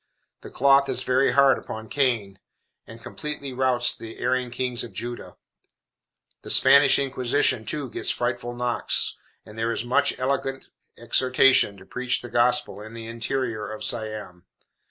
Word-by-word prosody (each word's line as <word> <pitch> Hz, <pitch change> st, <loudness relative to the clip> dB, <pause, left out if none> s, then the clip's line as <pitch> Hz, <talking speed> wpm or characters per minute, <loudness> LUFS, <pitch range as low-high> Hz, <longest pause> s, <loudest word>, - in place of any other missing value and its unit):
The -, -, -10 dB
cloth 140 Hz, +1 st, +3 dB
is 130 Hz, 0 st, -1 dB
very 130 Hz, +2 st, +2 dB
hard 140 Hz, -1 st, +4 dB
upon 110 Hz, 0 st, -8 dB
Cain, 110 Hz, -6 st, -1 dB, 0.5 s
and 115 Hz, 0 st, -13 dB
completely 140 Hz, +1 st, -5 dB
routs 125 Hz, -1 st, +1 dB
the 115 Hz, 0 st, -10 dB
erring 125 Hz, 0 st, -1 dB
kings 125 Hz, 0 st, -2 dB
of 120 Hz, -, -10 dB
Judah. 120 Hz, 0 st, -7 dB, 1.0 s
The -, -, -11 dB
Spanish 140 Hz, -1 st, +6 dB
Inquisition, 130 Hz, -3 st, +1 dB
too, 145 Hz, +4 st, -3 dB
gets -, -, -3 dB
frightful 120 Hz, 0 st, -3 dB
knocks, 120 Hz, 0 st, 0 dB, 0.3 s
and 105 Hz, +1 st, -11 dB
there 115 Hz, +1 st, -1 dB
is 115 Hz, -, -3 dB
much 140 Hz, +3 st, +1 dB
eloquent 135 Hz, 0 st, -3 dB, 0.3 s
exhortation 125 Hz, -2 st, +3 dB
to -, -, -15 dB
preach 125 Hz, 0 st, -2 dB
the 120 Hz, -, -8 dB
gospel 120 Hz, -3 st, +1 dB
in 110 Hz, +2 st, -11 dB
the 115 Hz, -1 st, -8 dB
interior 115 Hz, -2 st, -4 dB
of 110 Hz, -, -8 dB
Siam. 105 Hz, -5 st, -2 dB
125 Hz, 150 wpm, -24 LUFS, 115-135 Hz, 1.0 s, Spanish